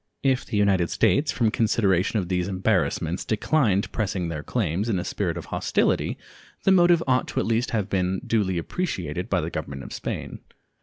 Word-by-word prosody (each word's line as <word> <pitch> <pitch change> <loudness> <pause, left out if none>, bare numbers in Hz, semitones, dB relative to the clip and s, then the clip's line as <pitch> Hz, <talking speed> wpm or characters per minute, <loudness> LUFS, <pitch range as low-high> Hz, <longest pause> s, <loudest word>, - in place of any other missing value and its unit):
If 135 -2 +1
the 110 - -2
United 95 -4 +3
States, 145 0 +2
from 115 -3 +1
consideration 105 -3 +2
of 95 -4 -1
these 90 0 0
embarrassments, 90 -2 0
declined 110 -2 +1
pressing 95 -5 -2
their 75 -3 -4
claims 100 +2 -1
in 100 - +1
a 90 - -2
spirit - - -2
of - - -6
hostility, - - +1 0.5
the 195 - +4
motive 175 -2 +5
ought 130 -1 0
at - - +2
least 115 +2 +1
to - - -9
have 105 -3 0
been 95 -2 0
duly 100 -5 +1
appreciated 90 - -3
by 90 -3 +1
the 80 +2 -4
Government 70 -1 -5
of - - -9
Spain. - - -5
100 Hz, 185 wpm, -25 LUFS, 90-115 Hz, 0.5 s, motive